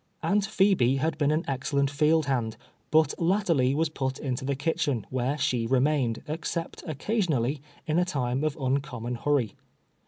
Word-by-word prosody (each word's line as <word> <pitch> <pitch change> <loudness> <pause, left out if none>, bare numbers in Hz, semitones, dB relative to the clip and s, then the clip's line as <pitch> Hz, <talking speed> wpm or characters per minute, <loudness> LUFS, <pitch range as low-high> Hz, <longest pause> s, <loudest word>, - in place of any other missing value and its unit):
Aunt 205 0 +2
Phebe 190 - +3
had 155 +3 0
been 145 -1 +3
an 155 +2 +1
excellent 140 +1 0
field 155 +2 +3
band, 120 -5 -1 0.3
but 155 -2 +4
latterly 165 -8 +2
was 160 +2 +2
put 135 -3 -3
into 130 -3 -3
the 140 +1 -1
kitchen, 140 -5 -1
where 130 +3 0
she 125 -5 0
remained, 130 -2 +1
except 165 +2 -4
occasionally, 155 - 0 0.2
in 155 +2 +1
a - - +4
time 135 -5 -1
of 155 -1 -1
uncommon 130 -3 -2
hurry. 130 -1 0
140 Hz, 155 wpm, -27 LUFS, 130-160 Hz, 0.3 s, but